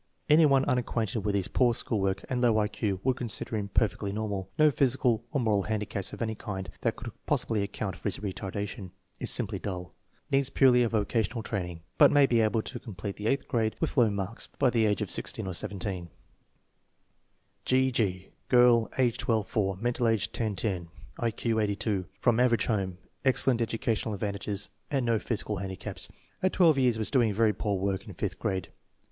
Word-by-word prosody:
Any 155 Hz, +1 st, +6 dB
one 135 Hz, -1 st, +4 dB
unacquainted 115 Hz, -3 st, 0 dB
with 105 Hz, 0 st, -1 dB
his 95 Hz, -3 st, 0 dB
poor 120 Hz, -3 st, +2 dB
school 110 Hz, -, -1 dB
work 95 Hz, 0 st, -1 dB
and 125 Hz, -1 st, -1 dB
low 115 Hz, -3 st, +4 dB
I 105 Hz, -1 st, +2 dB
Q 105 Hz, -2 st, -2 dB
would 130 Hz, -1 st, +1 dB
consider 115 Hz, -1 st, -3 dB
him 105 Hz, -2 st, -2 dB
per 110 Hz, +3 st, +3 dB
fectly 100 Hz, +1 st, -5 dB
normal. 100 Hz, -2 st, -3 dB
No 155 Hz, -1 st, +6 dB
physical 125 Hz, -4 st, +2 dB
or 145 Hz, -, 0 dB
moral 110 Hz, -5 st, +2 dB
handicaps 105 Hz, -3 st, -2 dB
of -, -, -4 dB
any 110 Hz, -1 st, -1 dB
kind 95 Hz, -3 st, -6 dB
that -, -, 0 dB
could -, -, -7 dB, 0.2 s
possibly 110 Hz, -2 st, +1 dB
account 100 Hz, -1 st, -3 dB
for 90 Hz, -, -18 dB
his 100 Hz, -, -1 dB
retardation. 100 Hz, 0 st, -5 dB, 0.3 s
Is -, -, +1 dB
simply 100 Hz, -2 st, +2 dB
dull. 90 Hz, -4 st, -5 dB, 0.4 s
Needs 135 Hz, -1 st, +3 dB
purely 130 Hz, -3 st, +5 dB
a 120 Hz, -, +2 dB
vocational 110 Hz, +1 st, 0 dB
training, 90 Hz, -5 st, -4 dB, 0.2 s
but -, -, +9 dB
may 145 Hz, -1 st, +5 dB
be 120 Hz, -3 st, +3 dB
able 110 Hz, 0 st, +1 dB
to 125 Hz, -, -6 dB
complete 100 Hz, -4 st, -6 dB
the 105 Hz, -, -3 dB
eighth 135 Hz, +2 st, 0 dB
grade 110 Hz, -2 st, 0 dB
with 160 Hz, -, -1 dB
low 120 Hz, -5 st, +5 dB
marks 100 Hz, +2 st, -3 dB
by 125 Hz, -, +3 dB
the 115 Hz, -2 st, +3 dB
age 105 Hz, -, +1 dB
of -, -, -5 dB
16 -, -, -2 dB
or 95 Hz, -, -3 dB
17. 90 Hz, -1 st, -3 dB, 1.6 s
G. 130 Hz, 0 st, +3 dB
G. 95 Hz, -6 st, -1 dB, 0.2 s
Girl, 120 Hz, -2 st, +5 dB
age 120 Hz, -2 st, +2 dB
12 110 Hz, -3 st, 0 dB
fc 95 Hz, -3 st, 0 dB
mental 120 Hz, +1 st, 0 dB
age 115 Hz, -3 st, +1 dB
10 110 Hz, -3 st, -2 dB
10; 95 Hz, -5 st, -2 dB, 0.3 s
I 120 Hz, -, +1 dB
Q 115 Hz, 0 st, -1 dB
82. 100 Hz, -2 st, -1 dB
From 120 Hz, -2 st, +3 dB
average 125 Hz, -2 st, +3 dB
home. 95 Hz, -5 st, -1 dB, 0.3 s
Excellent 130 Hz, -2 st, +3 dB
educational 115 Hz, -1 st, -1 dB
advantages 100 Hz, 0 st, -3 dB, 0.2 s
and 135 Hz, -4 st, 0 dB
no 115 Hz, -2 st, +2 dB
physical 105 Hz, -2 st, -2 dB
handi 95 Hz, 0 st, -4 dB
caps. -, -, -6 dB, 0.3 s
At 185 Hz, -, +1 dB
12 165 Hz, -6 st, +5 dB
years 125 Hz, -3 st, +3 dB
was 110 Hz, -, -1 dB
doing 120 Hz, -6 st, +3 dB
very 110 Hz, 0 st, +3 dB
poor 100 Hz, -2 st, -1 dB
work 95 Hz, 0 st, -2 dB
in -, -, -9 dB
fifth -, -, -3 dB
grade. 95 Hz, -2 st, -2 dB
110 Hz, 195 wpm, -29 LUFS, 100-120 Hz, 1.6 s, but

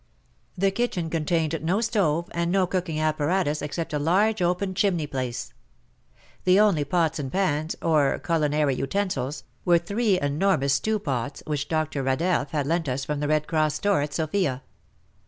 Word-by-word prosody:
The 195 Hz, +2 st, +2 dB
kitchen 190 Hz, -7 st, -2 dB
contained 165 Hz, 0 st, 0 dB
no 175 Hz, +6 st, +1 dB
stove, 185 Hz, -8 st, +1 dB
and 170 Hz, 0 st, -1 dB
no 190 Hz, 0 st, +3 dB
cooking 180 Hz, -3 st, -2 dB
apparatus 155 Hz, +1 st, 0 dB
except 155 Hz, +2 st, -4 dB
a 150 Hz, -, 0 dB
large 195 Hz, +7 st, +2 dB
open 180 Hz, +2 st, 0 dB
chimney 185 Hz, -5 st, +1 dB
place. 130 Hz, -4 st, -4 dB, 0.9 s
The 185 Hz, +2 st, +5 dB
only 200 Hz, -8 st, +4 dB
pots 160 Hz, +1 st, 0 dB
and 135 Hz, -3 st, -4 dB
pans, 160 Hz, -5 st, 0 dB
or 150 Hz, -4 st, +3 dB
culinary 150 Hz, -3 st, +1 dB
utensils, 140 Hz, -1 st, -2 dB, 0.2 s
were 175 Hz, -1 st, +5 dB
three 200 Hz, +3 st, +1 dB
enormous 145 Hz, -1 st, +1 dB
stew 215 Hz, +9 st, +1 dB
pots 140 Hz, -, -3 dB
which 145 Hz, -1 st, -2 dB
Dr. 155 Hz, -3 st, -1 dB
Radeff 140 Hz, +3 st, 0 dB
had 145 Hz, -3 st, -1 dB
lent 165 Hz, 0 st, 0 dB
us 130 Hz, +1 st, -2 dB
from 150 Hz, -1 st, -2 dB
the 145 Hz, -, -1 dB
Red 155 Hz, 0 st, +1 dB
Cross 155 Hz, -2 st, +1 dB
store 200 Hz, -6 st, +1 dB
at 145 Hz, 0 st, -3 dB
Sofia. 155 Hz, -5 st, -1 dB
160 Hz, 160 wpm, -25 LUFS, 145-185 Hz, 0.9 s, The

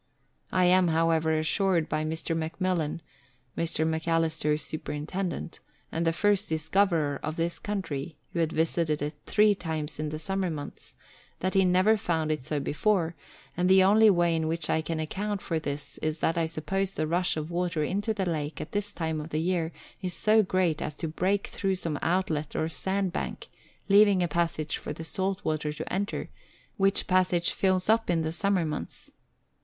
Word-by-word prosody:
I 185 Hz, -1 st, +3 dB
am, 180 Hz, 0 st, +5 dB
however, 160 Hz, -1 st, +2 dB
assured 170 Hz, +1 st, +1 dB
by 155 Hz, -, -1 dB
Mr. 160 Hz, +1 st, -2 dB
McMillan 165 Hz, 0 st, -1 dB, 0.5 s
(Mr. 165 Hz, -1 st, 0 dB
Macalister's 160 Hz, -1 st, 0 dB
superintendent), 165 Hz, +4 st, -4 dB, 0.3 s
and 165 Hz, +1 st, -1 dB
the -, -, +4 dB
first 205 Hz, +3 st, +2 dB
discoverer 160 Hz, -2 st, +1 dB
of 155 Hz, +1 st, -3 dB
this 170 Hz, +1 st, -2 dB
country, 175 Hz, -7 st, -4 dB, 0.2 s
who 170 Hz, -, -1 dB
had 160 Hz, -1 st, +1 dB
visited 160 Hz, -2 st, +1 dB
it 150 Hz, +1 st, -3 dB
three 210 Hz, 0 st, +5 dB
times 160 Hz, -5 st, -4 dB
in 155 Hz, 0 st, -2 dB
the 155 Hz, -, -4 dB
summer 190 Hz, +3 st, -1 dB
months, 150 Hz, -3 st, -7 dB, 0.5 s
that 185 Hz, +1 st, 0 dB
he 195 Hz, -1 st, +4 dB
never 185 Hz, +5 st, +4 dB
found 160 Hz, -5 st, -1 dB
it 150 Hz, -4 st, -2 dB
so 150 Hz, +1 st, -1 dB
before, 165 Hz, +4 st, +1 dB, 0.4 s
and 180 Hz, +1 st, +1 dB
the 190 Hz, 0 st, +7 dB
only 215 Hz, +3 st, +6 dB
way 175 Hz, -3 st, +3 dB
in 160 Hz, -1 st, 0 dB
which 165 Hz, -1 st, 0 dB
I 160 Hz, -, +2 dB
can 160 Hz, +1 st, -3 dB
account 200 Hz, +6 st, -2 dB
for 165 Hz, -3 st, -2 dB
this 145 Hz, -1 st, -5 dB
is 155 Hz, 0 st, -1 dB
that 165 Hz, +2 st, +1 dB
I 165 Hz, -1 st, +1 dB
suppose 190 Hz, +5 st, -2 dB
the 155 Hz, -, 0 dB
rush 175 Hz, +2 st, +1 dB
of 155 Hz, +2 st, -4 dB
water 170 Hz, -2 st, 0 dB
into 205 Hz, +7 st, -1 dB
the 200 Hz, -3 st, -1 dB
lake 155 Hz, -2 st, -2 dB
at 155 Hz, -, -6 dB
this 205 Hz, 0 st, -2 dB
time 160 Hz, -2 st, -2 dB
of 150 Hz, -, -8 dB
the 155 Hz, -, -2 dB
year 170 Hz, -1 st, 0 dB, 0.3 s
is 180 Hz, -2 st, -2 dB
so 220 Hz, +1 st, +4 dB
great 185 Hz, -5 st, +1 dB
as 150 Hz, -, -3 dB
to 165 Hz, -, -4 dB
break 190 Hz, +5 st, 0 dB
through 195 Hz, -1 st, -1 dB
some 165 Hz, -5 st, -3 dB
outlet 165 Hz, -4 st, 0 dB
or 160 Hz, -, 0 dB
sand 190 Hz, +2 st, -1 dB
bank, -, -, -4 dB, 0.4 s
leaving 200 Hz, -2 st, +6 dB
a -, -, +1 dB
passage 165 Hz, -2 st, -1 dB
for -, -, -5 dB
the 165 Hz, -, -7 dB
salt 190 Hz, +4 st, -2 dB
water 155 Hz, -1 st, -1 dB
to 150 Hz, -, -6 dB
enter, 200 Hz, +2 st, -2 dB, 0.5 s
which 195 Hz, 0 st, +3 dB
passage 180 Hz, -3 st, +2 dB
fills 185 Hz, -1 st, +1 dB
up 225 Hz, -1 st, +3 dB
in 165 Hz, -2 st, +2 dB
the 160 Hz, -, -1 dB
summer 195 Hz, 0 st, +1 dB
months. 150 Hz, -, -5 dB
170 Hz, 185 wpm, -28 LUFS, 155-190 Hz, 0.5 s, the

